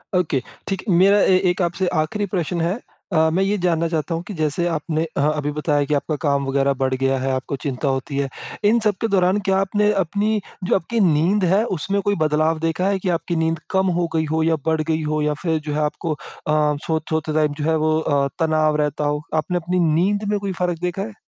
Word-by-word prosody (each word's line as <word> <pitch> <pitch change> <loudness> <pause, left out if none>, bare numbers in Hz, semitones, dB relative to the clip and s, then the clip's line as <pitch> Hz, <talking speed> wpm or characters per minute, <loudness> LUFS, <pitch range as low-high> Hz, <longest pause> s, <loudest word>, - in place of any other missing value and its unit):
Okay 155 -7 +1 0.3
ठीक। 195 -2 -3
मेरा 195 +3 +5
ए 185 - +5
एक 180 - -3
आपसे 175 +1 0
आख़िरी 205 +7 -2
प्रश्न 175 -1 -1
है। 170 +3 0 0.4
अ, 160 -1 +4
मैं 190 +3 +2
ये 200 +2 +1
जानना 165 -1 +2
चाहता 165 0 -2
हूँ 165 - -4
कि 210 - -5
जैसे 155 0 0
आपने 160 -1 -1
अ - - +2
अभी 150 -1 -2
बताया 150 -1 +1
कि 150 - -1
आपका 150 +2 0
काम 140 -1 +1
वग़ैरह 135 +1 +1
बढ़ 130 0 +1
गया 135 +1 +1
है, 135 +1 -1
आपको 130 +1 -2
चिंता 140 +1 -2
होती 135 +1 -2
है 140 -1 0 0.4
इन 235 +2 +4
सब 210 -2 +3
के 225 - +1
दौरान, 190 -1 +2
क्या 195 -2 +1
आपने 205 +2 +2
अपनी 205 +4 0 0.2
जो 180 - +2
आपकी 210 +6 -1
नींद 170 +7 +2
है 205 +3 +4
उसमें 200 +6 -1
कोई 205 0 +1
बदलाव 155 +1 +1
देखा 165 +3 0
है 200 -1 0
कि 185 - -2
आपकी 170 +1 -4
नींद 165 0 0
कम 190 0 +2
हो 175 - +1
गई 160 0 +1
हो 160 0 +1
या 165 0 +3
बढ़ 160 -1 +1
गई 160 0 -1
हो 155 0 0
या 150 0 +1
फ़िर 165 -3 +1
जो - - -1
है 150 - -1
आपको 155 +2 -2
अ, - - -9 0.3
सो 150 +1 +1
सोते 160 -1 -1
टाइम 150 -1 +2
जो - - -1
है 160 - +3
वो 155 0 +2
अ, 140 -3 +1
तनाव 155 -2 +2
रहता 150 0 -2
हो? 145 0 0
आपने 160 +3 0
अपनी 180 +1 -1
नींद 200 +6 +1
में 205 - +1
कोई 200 -1 -3
फ़र्क 175 -2 0
देखा 180 +2 -2
है? 210 +1 -6
160 Hz, 235 wpm, -21 LUFS, 150-185 Hz, 0.4 s, मेरा